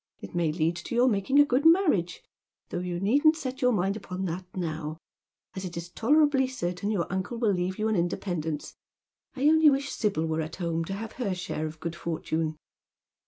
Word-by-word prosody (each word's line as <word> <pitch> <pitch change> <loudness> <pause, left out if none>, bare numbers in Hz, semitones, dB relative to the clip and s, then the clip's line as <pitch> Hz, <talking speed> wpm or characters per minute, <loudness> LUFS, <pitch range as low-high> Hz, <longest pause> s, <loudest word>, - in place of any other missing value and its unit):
It - - -10
may 170 -3 +1
lead 165 +2 0
to 175 +7 -5
your 245 +2 +5
making 225 +4 +2
a 290 - +8
good 265 0 +1
marriage, 315 - +3 0.5
though - - -3
you 175 -1 -3
needn't 285 - +4
set 265 -3 -5
your 250 -1 +4
mind 195 -2 +1
upon 190 -2 -5
that 180 +1 -4
now, 160 -3 -3 0.6
as 190 - -5
it 175 -2 -6
is 170 +1 -6
tolerably 280 +3 +3
certain 180 -5 -3
your 195 -6 0
uncle 190 +5 -2
will 225 -4 +2
leave 180 +1 -2
you 215 - 0
an 220 - +1
independence. 170 -3 -2 0.6
I 260 - -6
only 315 0 +7
wish 280 0 0
Sibyl 200 -7 0
were 160 0 -1
at 160 +1 -5
home 165 -2 -1
to 195 - -4
have 215 +2 -5
her 200 -6 0
share 155 -3 -3
of 155 0 -9
good 170 +1 -4
fortune." 160 -2 -2
185 Hz, 200 wpm, -28 LUFS, 170-245 Hz, 0.6 s, a